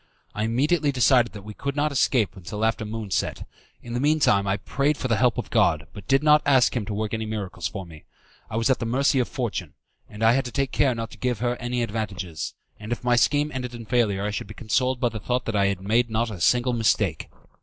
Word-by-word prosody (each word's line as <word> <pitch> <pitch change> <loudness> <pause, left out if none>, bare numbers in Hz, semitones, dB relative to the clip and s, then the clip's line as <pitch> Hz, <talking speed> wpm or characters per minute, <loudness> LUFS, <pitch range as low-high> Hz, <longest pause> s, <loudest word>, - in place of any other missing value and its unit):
I 105 - -1
immediately 145 +6 +1
decided 125 -2 +4
that 100 -2 -9
we 105 +1 -8
could 140 +5 -4
not 150 +1 +1
escape 125 -5 +2
till 105 +5 -2
after 115 0 0
the 105 - -6
moon 110 -2 -5
set; - - -2 0.4
in 120 - -7
the 120 - -1
mean 150 +3 +2
time 100 -8 +3
I 95 +1 +1
prayed 140 +9 0
for 130 - -2
the 115 - +2
help 125 -1 +2
of - - -4
God, 80 0 +2
but 100 -3 -11
did 135 +2 +3
not 150 0 +6
ask 130 -4 +4
Him 110 -5 -2
to 105 - -3
work 110 +1 -3
any 110 -1 -2
miracles 100 -5 -4
for 95 -3 -7
me. 80 -3 -14 0.4
I 110 - -3
was 115 +3 +2
at 130 - +1
the 115 - -3
mercy 135 +3 +2
of 125 - +1
Fortune, 110 - -4 0.3
and 105 +1 -6
I 115 - +6
had 135 +2 +1
to 125 - -5
take 135 0 -1
care 135 -4 +2
not 115 0 -5
to - - -13
give 125 -2 0
her 120 +2 -1
any 120 0 -2
advantages; 100 -7 -4 0.2
and 110 +2 -8
if 120 - -3
my 125 0 +3
scheme 145 +5 +2
ended 125 -2 -4
in 115 -1 -8
failure 105 -5 +1
I 105 - -1
should 105 - -4
be 105 - -10
consoled 125 +4 0
by 120 - +2
the 110 -1 -6
thought 125 +4 -1
that 115 - -2
I 100 -1 +3
had 100 -2 -2
not 95 - -9
made 120 +2 +2
a 110 -4 -2
single 125 +5 +3
mistake. 105 -7 +1
115 Hz, 260 wpm, -24 LUFS, 105-125 Hz, 0.4 s, not